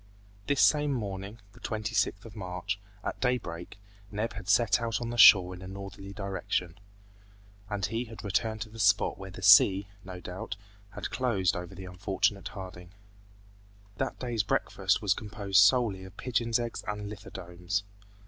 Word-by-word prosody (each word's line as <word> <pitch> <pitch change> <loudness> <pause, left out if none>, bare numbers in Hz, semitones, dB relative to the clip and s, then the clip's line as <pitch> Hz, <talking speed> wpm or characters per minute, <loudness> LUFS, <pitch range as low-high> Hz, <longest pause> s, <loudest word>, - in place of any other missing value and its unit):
This 145 -2 +2
same 150 -1 +4
morning, 100 -1 -5
the - - -16
26th 110 -2 -1
of 115 - -11
March, 95 0 -4 0.2
at - - -4
daybreak, 100 -10 -2 0.3
Neb 110 +2 -3
had 100 -2 -8
set 115 +2 +4
out 115 -3 -1
on 120 -1 -4
the - - -4
shore 95 -4 +9
in 90 - -10
a 95 - -8
northerly 100 0 -8
direction, 95 -2 -3 0.9
and 100 -2 -1
he 115 +3 -2
had 115 -1 -10
returned 110 +2 -1
to 110 - -5
the 115 +1 -12
spot 100 -2 +3
where 95 0 -7
the 95 +1 -10
sea, 100 0 +7 0.2
no 90 -1 -8
doubt, 90 +2 -6 0.4
had - - -5
closed 115 -7 +1
over 90 -1 -6
the 95 - -8
unfortunate 95 +2 -1
Harding. 90 -2 -9 1.0
That - - -2
day's 120 -3 -1
breakfast 100 - 0
was - - +4
composed 100 -3 0
solely 105 -3 +4
of 95 +1 -12
pigeon's 115 -2 0
eggs 120 -1 -4
and 105 0 -3
lithodomes. 95 -2 -5
100 Hz, 160 wpm, -29 LUFS, 95-110 Hz, 1.0 s, shore